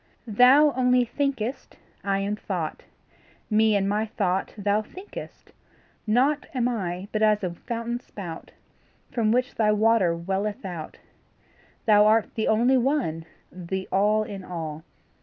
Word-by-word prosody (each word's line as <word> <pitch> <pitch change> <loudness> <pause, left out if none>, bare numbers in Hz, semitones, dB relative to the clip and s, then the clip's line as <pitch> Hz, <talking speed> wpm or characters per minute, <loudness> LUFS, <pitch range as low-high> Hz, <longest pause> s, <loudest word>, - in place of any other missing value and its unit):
Thou 255 +7 +5
only 250 -1 +3
thinkest 265 -1 -3 0.3
I 195 0 0
am 200 +1 -1
thought; 180 -7 -4 0.7
Me 215 0 +4
and 195 -1 +1
my 210 +2 0
thought 190 -3 -1
thou 205 +1 +1
thinkest. 375 - -11 0.6
Nought 265 +7 +2
Am 245 -1 +1
I 190 -5 -3
but 215 - -1
as 215 -1 +3
a 180 - -1
fountain 235 +5 -4
spout 175 -9 -9 0.6
From 220 -3 +1
which 250 +3 +1
thy 215 -2 +2
water 210 -5 +3
welleth 195 +6 -3
out. 170 -4 -6 0.9
Thou 210 -1 +6
art 220 0 +2
the 220 - -1
only 240 +4 +4
One, 240 - -1 0.3
the 185 +1 -5
All 210 +3 +3
in 200 -2 -7
all. 160 -3 -6
215 Hz, 140 wpm, -25 LUFS, 190-240 Hz, 0.9 s, Thou